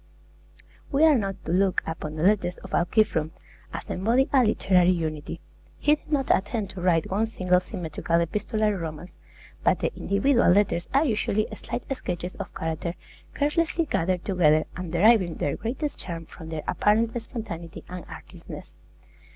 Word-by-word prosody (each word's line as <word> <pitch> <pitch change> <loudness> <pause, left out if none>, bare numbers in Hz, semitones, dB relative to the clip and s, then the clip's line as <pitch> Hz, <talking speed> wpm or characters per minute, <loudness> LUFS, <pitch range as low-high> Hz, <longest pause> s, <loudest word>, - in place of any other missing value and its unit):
We 285 +2 +3
are 320 -1 +7
not 200 -7 0
to - - -2
look 190 +1 +2
upon 160 -1 -5
the 155 - -3
letters 190 -2 +2
of 190 - -10
Alciphron 175 -3 +2 0.4
as - - -6
embodying 235 +8 +1
a 265 -2 +6
literary 185 -5 +3
unity. 155 -4 -2 0.4
He 295 - +3
did 300 - -5
not 275 -3 +3
attempt 205 0 -3
to 185 - -7
write 175 -2 +2
one 215 +4 +1
single 180 -4 +2
symmetrical 170 -2 -2
epistolary 210 +5 0
romance; 165 0 -6 0.5
but - - +4
the - - -2
individual 240 +6 +2
letters 180 -2 +3
are 275 +4 +3
usually 215 -3 0
slight 240 +2 -4
sketches 180 -5 -4
of - - -6
character 165 +2 -3 0.4
carelessly 325 +3 +1
gathered 180 - -1
together, 155 -5 +3
and 180 -2 -5
deriving 185 -1 +4
their 140 - -1
greatest 270 +6 -4
charm 165 -2 -6
from 160 0 -11
their 160 -2 -4
apparent 220 +2 +2
spontaneity 170 -9 -7
and 180 -1 -7
artlessness. - - -10
190 Hz, 155 wpm, -26 LUFS, 170-225 Hz, 0.5 s, are